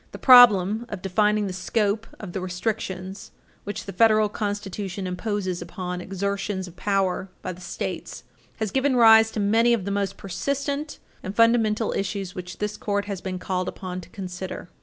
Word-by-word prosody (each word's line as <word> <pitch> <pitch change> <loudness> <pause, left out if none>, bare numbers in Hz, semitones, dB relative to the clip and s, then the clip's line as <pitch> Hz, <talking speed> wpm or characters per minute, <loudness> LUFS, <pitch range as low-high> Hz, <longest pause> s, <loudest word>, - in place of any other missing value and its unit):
The - - -6
problem 230 -3 +7
of 180 - -6
defining 210 +2 +2
the 190 - -4
scope 210 +3 -1
of 190 -5 -8
the 190 - -3
restrictions 185 0 -4 0.4
which 205 - -5
the 195 - -7
Federal 215 +1 +4
Constitution 205 -2 -4
imposes 185 -1 -3
upon 180 +1 -5
exertions 195 0 -3
of 175 - -13
power 195 0 0
by 185 - -3
the 180 - -14
States 175 0 -5 0.3
has 220 -4 -2
given 270 0 +1
rise 225 -2 +7
to 220 - -5
many 225 +4 +3
of 215 -6 -1
the 200 - -2
most 200 -1 -1
persistent 280 - -3 0.2
and 190 +2 -6
fundamental 230 -1 +3
issues 195 -2 -3
which 180 0 -7
this 210 0 -3
Court 205 -1 -1
has 200 -3 -5
been 185 -1 -4
called 185 0 -2
upon 185 -1 -6
to 180 - -14
consider. 185 -1 -7
200 Hz, 170 wpm, -24 LUFS, 185-215 Hz, 0.4 s, problem